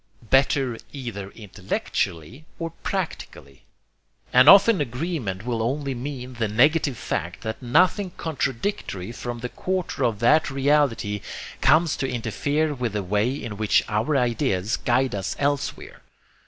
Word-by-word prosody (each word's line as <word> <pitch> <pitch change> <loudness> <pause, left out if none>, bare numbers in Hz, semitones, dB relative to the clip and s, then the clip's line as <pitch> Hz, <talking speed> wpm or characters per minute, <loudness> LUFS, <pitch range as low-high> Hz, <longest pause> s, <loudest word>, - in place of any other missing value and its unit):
Better 135 -3 +3
either 115 -8 -6
intellectually 100 - -4
or 165 -1 -4
practically! 160 - -5 0.7
And 125 +3 +8
often 200 -2 +7
agreement 125 - -3
will 120 -2 -1
only 135 +4 -1
mean 130 0 -6
the 115 -2 -1
negative 140 +4 +3
fact - - -4
that 110 0 -5
nothing 180 - +3
contradictory 135 - -3
from 120 0 -6
the 125 - -4
quarter 185 +4 -3
of 115 -3 +1
that 155 +9 +3
reality 135 -7 +1 0.4
comes 160 0 +4
to 135 -1 -2
interfere 140 +6 -1
with 125 -5 -3
the 105 -1 -2
way 105 +5 +1
in 120 -7 -6
which 110 -1 +3
our 115 +8 0
ideas 120 -5 0
guide 130 +2 +1
us 100 -1 -3
elsewhere. 145 -1 -2
125 Hz, 130 wpm, -24 LUFS, 110-145 Hz, 0.7 s, And